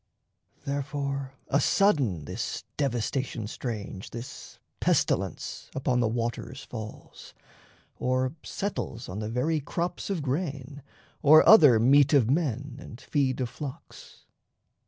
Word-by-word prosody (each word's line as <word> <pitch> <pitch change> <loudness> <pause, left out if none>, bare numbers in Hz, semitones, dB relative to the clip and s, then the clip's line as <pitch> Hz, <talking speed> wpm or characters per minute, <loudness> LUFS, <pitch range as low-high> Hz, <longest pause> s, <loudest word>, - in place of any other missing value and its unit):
Therefore, 140 -1 -3 0.2
asudden 140 - +2
this - - -4
devastation 125 -3 -1
strange, 105 -4 -5
This 120 +2 -9 0.2
pestilence, - - 0
upon 130 -2 +1
the 120 - +2
waters 120 +3 -3
falls, 110 -2 -9 0.6
Or 130 +1 0
settles 130 - -4
on 95 +3 -5
the 105 0 -3
very 150 +7 0
crops 170 +7 -3
of 185 -7 -2
grain 140 -1 -3 0.4
Or 155 +2 +7
other 150 - +8
meat 140 +5 +5
of 130 -4 +4
men 140 -4 -1
and 120 -3 -10
feed 135 -1 0
of 125 - -1
flocks. 145 +3 -10
135 Hz, 115 wpm, -27 LUFS, 120-145 Hz, 0.6 s, other